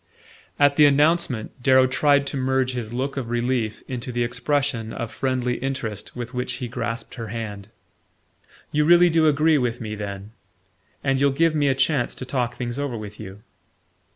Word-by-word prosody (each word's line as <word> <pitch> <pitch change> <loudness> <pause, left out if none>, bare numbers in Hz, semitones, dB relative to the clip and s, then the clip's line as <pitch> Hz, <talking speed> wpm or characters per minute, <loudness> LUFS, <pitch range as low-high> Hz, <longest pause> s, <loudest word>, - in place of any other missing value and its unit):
At 145 -1 +4
the 150 - +8
announcement, 145 -5 +1
Darrow 130 0 +5
tried 140 +2 +3
to 140 - -4
merge 130 -1 0
his 115 -3 -5
look 135 +3 -3
of 125 -4 -3
relief 120 -2 -1
into 125 0 -5
the 120 0 0
expression 125 -1 -1
of 115 - -5
friendly 130 -2 -1
interest 125 -6 -4
with 120 +1 -6
which 125 0 -2
he 125 - -4
grasped 115 0 -4
her 115 -3 -6
hand. 105 -2 -6 1.0
"You 150 0 +2
really 175 +2 +6
do 160 -1 +4
agree 155 +1 +3
with 120 -2 -1
me, 110 -2 -5
then? 100 0 -6 0.7
And 135 -1 +1
you'll 140 - +5
give 160 +4 +2
me 145 -2 +2
a 135 - +2
chance 135 -2 +1
to 130 - -6
talk 125 -2 -2
things 120 +1 -4
over 140 -5 -2
with 105 -1 -9
you?" 100 -1 -10
130 Hz, 180 wpm, -23 LUFS, 115-140 Hz, 1.0 s, the